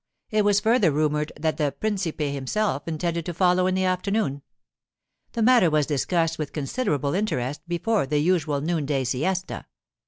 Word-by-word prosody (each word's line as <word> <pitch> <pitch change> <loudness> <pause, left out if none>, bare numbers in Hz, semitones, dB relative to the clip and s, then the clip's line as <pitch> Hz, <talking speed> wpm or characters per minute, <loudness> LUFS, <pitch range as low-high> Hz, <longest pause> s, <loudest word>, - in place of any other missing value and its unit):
It 215 -1 +2
was 205 0 +4
further 220 -3 +3
rumoured 150 +1 0
that 160 0 -1
the 145 -3 0
principe 195 -7 -2
himself 140 +3 -1
intended 170 +1 -2
to 175 - -4
follow 180 0 +3
in 185 - +1
the 190 - +1
afternoon. 185 -5 0 0.9
The 230 - 0
matter 240 -7 +5
was 150 -1 +2
discussed 165 +3 0
with 150 -2 -4
considerable 150 - -1
interest 145 - -1
before 175 0 0
the 150 - 0
usual 155 -3 +1
noonday 150 -4 -1
siesta. 175 +10 -2
165 Hz, 155 wpm, -24 LUFS, 145-190 Hz, 0.9 s, matter